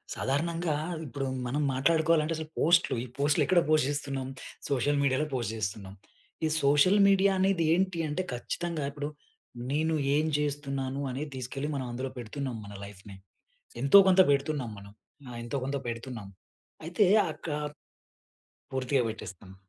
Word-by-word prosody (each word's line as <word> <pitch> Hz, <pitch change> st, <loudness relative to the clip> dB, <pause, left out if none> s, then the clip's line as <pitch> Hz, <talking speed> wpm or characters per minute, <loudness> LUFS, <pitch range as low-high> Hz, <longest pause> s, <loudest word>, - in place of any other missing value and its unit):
సాధారణంగా, 165 Hz, +3 st, -1 dB, 0.3 s
ఇప్పుడు 140 Hz, 0 st, -4 dB, 0.2 s
మనం 140 Hz, +5 st, -1 dB
మాట్లాడుకోవాలంటే 160 Hz, +3 st, +2 dB
అసలు 155 Hz, -1 st, -6 dB
పోస్ట్‌లు 170 Hz, -3 st, +4 dB
ఈ -, -, -5 dB
పోస్ట్‌లు 145 Hz, +1 st, +3 dB
ఎక్కడ 180 Hz, -2 st, +4 dB
పోస్ట్ 155 Hz, -3 st, +4 dB
జేస్తున్నాం? 140 Hz, -2 st, -3 dB, 0.4 s
సోషల్ 140 Hz, +1 st, +1 dB
మీడియాల 140 Hz, +2 st, +2 dB
పోస్ట్ 120 Hz, -3 st, -2 dB
జేస్తున్నాం. 100 Hz, -2 st, -4 dB, 0.5 s
ఈ -, -, +3 dB, 0.2 s
సోషల్ 145 Hz, +8 st, +5 dB
మీడియా 195 Hz, 0 st, +4 dB
అనేదేంటి 185 Hz, -1 st, +2 dB
అంటే, 155 Hz, +5 st, -2 dB
ఖచ్చితంగా 155 Hz, +5 st, -3 dB
ఇప్పుడు 145 Hz, +1 st, -4 dB, 0.6 s
నేను 160 Hz, +3 st, +1 dB, 0.2 s
ఏం 155 Hz, +1 st, +2 dB
జేస్తున్నాను 140 Hz, -2 st, -2 dB
అనేది 145 Hz, +3 st, -5 dB
తెసుకెళ్ళి 135 Hz, +3 st, -4 dB
మనం 130 Hz, -2 st, -3 dB
అందులో 130 Hz, +2 st, -4 dB
పెడుతున్నాం, 125 Hz, +2 st, -4 dB
మన 100 Hz, -, -10 dB
లైఫ్‌నే. 100 Hz, 0 st, -12 dB, 0.7 s
ఎంతో, 140 Hz, +8 st, +8 dB
కొంత 190 Hz, 0 st, +6 dB
పెడుతున్నాం 140 Hz, -3 st, 0 dB
మనం. 100 Hz, 0 st, -12 dB, 0.4 s
ఆ! -, -, -8 dB
ఎంతో 120 Hz, +4 st, -4 dB
కొంత 140 Hz, +2 st, -2 dB
పెడుతున్నాం. 115 Hz, -3 st, -6 dB, 0.6 s
అయితే, 175 Hz, +4 st, +2 dB, 0.3 s
అక్క 165 Hz, -, -10 dB, 1.2 s
పూర్తిగా 130 Hz, 0 st, +1 dB
పెట్టేస్తాను. 95 Hz, -3 st, -9 dB
140 Hz, 135 wpm, -29 LUFS, 130-160 Hz, 1.2 s, ఎంతో